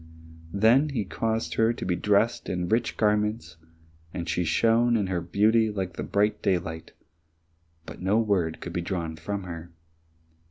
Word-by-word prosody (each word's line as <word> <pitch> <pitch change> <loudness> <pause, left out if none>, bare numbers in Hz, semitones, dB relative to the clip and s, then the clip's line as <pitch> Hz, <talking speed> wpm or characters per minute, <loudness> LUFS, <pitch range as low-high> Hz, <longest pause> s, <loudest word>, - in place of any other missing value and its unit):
Then 120 +9 +4
he 120 -8 -2
caused 110 -3 -2
her 115 +5 +2
to - - -6
be 90 - 0
dressed 105 +5 +1
in 90 -1 -2
rich 115 +1 0
garments, 105 -6 0 0.5
and 85 0 -5
she 90 +2 0
shone 115 +8 +3
in 105 - 0
her 95 -2 -2
beauty 110 +4 +2
like 95 -4 -3 0.2
bright 105 +1 +1
daylight, 80 -3 -2 0.9
but - - -10
no 95 +4 +2
word 95 -8 0
could 90 - -6
be 90 - -1
drawn 85 -2 -3
from 100 +5 -4
her. 85 -1 -8
100 Hz, 155 wpm, -26 LUFS, 85-110 Hz, 0.9 s, Then